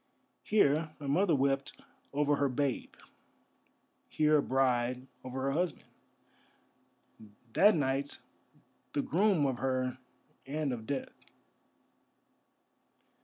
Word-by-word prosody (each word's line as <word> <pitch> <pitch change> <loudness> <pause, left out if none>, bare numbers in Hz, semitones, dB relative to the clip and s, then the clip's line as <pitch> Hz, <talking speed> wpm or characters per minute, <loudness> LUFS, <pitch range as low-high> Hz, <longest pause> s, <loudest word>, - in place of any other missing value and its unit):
Here 160 -6 +2
a 145 - -6
mother 170 +4 +3
wept 135 +1 0 0.3
over 145 0 +1
her 140 - +1
babe, 135 0 -2 1.1
here 155 0 +3
a - - +3
bride 125 -1 +1 0.2
over 130 +1 -5
her 135 - +1
husband—that 140 - -3
night 140 -1 -1 0.8
the 145 - 0
groom 185 -2 +2
of 130 -3 -1
her 130 -1 -1 0.5
and 145 -1 -1
of 110 -2 -7
death. 140 -2 -3
140 Hz, 95 wpm, -31 LUFS, 130-150 Hz, 1.1 s, mother